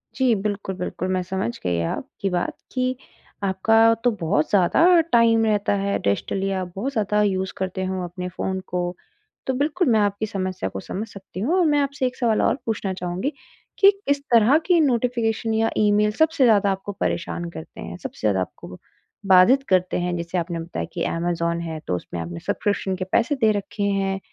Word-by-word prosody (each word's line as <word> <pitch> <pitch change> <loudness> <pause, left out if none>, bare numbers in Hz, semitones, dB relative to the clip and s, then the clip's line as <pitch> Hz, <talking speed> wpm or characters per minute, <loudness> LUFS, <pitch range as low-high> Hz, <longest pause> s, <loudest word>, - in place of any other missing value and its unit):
जी, 260 -3 +3
बिल्कुल, 200 -2 -3
बिल्कुल। 180 0 -4
मैं 185 - 0
समझ 185 - -3
गई 90 -2 0
आपकी 195 - -4
बात 180 -1 -2 0.2
कि 255 0 0 0.5
आपका 195 +3 +2 0.3
तो 245 - +4
बहुत 160 -2 +1
ज़्यादा 190 - +3 0.3
टाइम 230 -1 +4
रहता 210 -2 +1
है 200 0 0
डेस्टिलिया, 190 - -1
बहुत 195 +10 -4
ज़्यादा 210 -4 +1
यूज़ 190 -2 -1
करते 190 0 -3
हो 185 -1 -3
अपने 180 +1 -5
फ़ोन 190 0 -2
को। 180 0 -2 0.7
तो 265 - +1
बिल्कुल, 315 +4 +1
मैं 220 -2 +4
आपकी 205 +1 0
समस्या 185 - -3
को 95 - -6
समझ 205 - -5
सकती 195 -2 -10
हूँ, 245 - 0
और 365 -2 +3
मैं 295 -2 +3
आपसे 280 -1 -1
एक 250 - -6
सवाल 230 -4 +2
और - - +2
पूछना 210 -4 -2
चाहूँगी 180 +10 -2 0.5
कि 395 0 +8 0.2
किस 285 0 +2
तरह 235 +5 +6
की 355 -2 +4
नोटिफ़िकेशन 235 -4 0
या 225 +1 +2
ईमेल 210 0 +3
सबसे 320 -3 +3
ज़्यादा 205 -4 +4
आपको 195 +1 -4
परेशान 175 0 -2
करते 160 -1 -10
हैं, 85 +1 -7
सबसे - - -8
ज़्यादा 95 -2 +1
आपको 90 -1 -7 0.5
बाधित 195 +9 +6
करते 185 -1 +2
हैं? 175 0 -1
जैसे 170 +2 -3
आपने 170 -1 -2
बताया 165 +1 -4
कि 170 - -2
अमेज़न 170 0 -1
है, 160 -2 -5
तो 90 - 0
उसमें 85 -1 -6
आपने 85 +1 -6
सब्सक्रिप्शन 195 - -1
के 185 0 -4
पैसे 245 +6 +2
दे 220 -1 +5
रखे 205 +1 -6
हैं, 195 -1 0
195 Hz, 185 wpm, -23 LUFS, 180-225 Hz, 0.7 s, कि